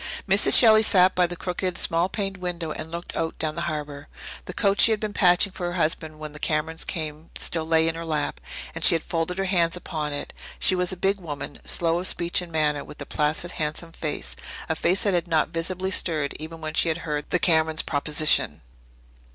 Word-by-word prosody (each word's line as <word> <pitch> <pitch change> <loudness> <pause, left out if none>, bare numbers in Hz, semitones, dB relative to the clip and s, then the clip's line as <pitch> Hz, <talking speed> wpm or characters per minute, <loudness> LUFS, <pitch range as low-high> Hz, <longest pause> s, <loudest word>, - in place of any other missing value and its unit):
Mrs. - - +7
Shelley 220 -2 +7
sat 185 -4 +4
by 180 -1 +2
the 175 - -6
crooked, 180 +1 -3
small 170 +3 +2
paned 195 -1 -3
window 175 -3 -4
and 155 +1 -7
looked 170 +1 -7
out 160 - -3
down 155 -1 -2
the 170 - -5
harbour. 145 -2 -6 0.4
The - - -7
coat 200 -2 +2
she - - +8
had 220 -1 +1
been 210 -1 -4
patching 180 +1 +4
for 180 -1 -5
her 175 - -4
husband 155 -1 -1
when 155 -1 -8
the 150 - -11
Camerons 160 +2 -1
came 155 -1 -6
still 165 -2 -1
lay 160 0 +3
in 165 - 0
her 165 +1 -6
lap, 150 - -3 0.3
and - - -6
she - - +8
had 165 - -2
folded 175 +1 -3
her 195 - -1
hands 175 -2 +1
upon 155 -4 -4
it. 145 0 -5 0.2
She - - +5
was 180 0 +1
a 185 - -5
big 195 +3 0
woman, 145 -5 -7
slow 170 0 0
of 185 - -3
speech 175 0 0
and 175 -1 -9
manner, 150 -2 0
with - - -13
a - - -6
placid, 155 +3 -1
handsome 155 +2 -4
face 155 -2 -5 0.3
a - - 0
face 180 +4 0
that 200 - +1
had 175 0 0
not 160 -2 +1
visibly 185 +3 -3
stirred 155 -6 0
even 160 +1 -8
when 155 0 -5
she 165 - +2
had 160 +1 -3
heard 150 -2 -4
the - - +2
Camerons' 160 -2 +3
proposition. 150 +1 +1
165 Hz, 220 wpm, -24 LUFS, 155-180 Hz, 0.4 s, she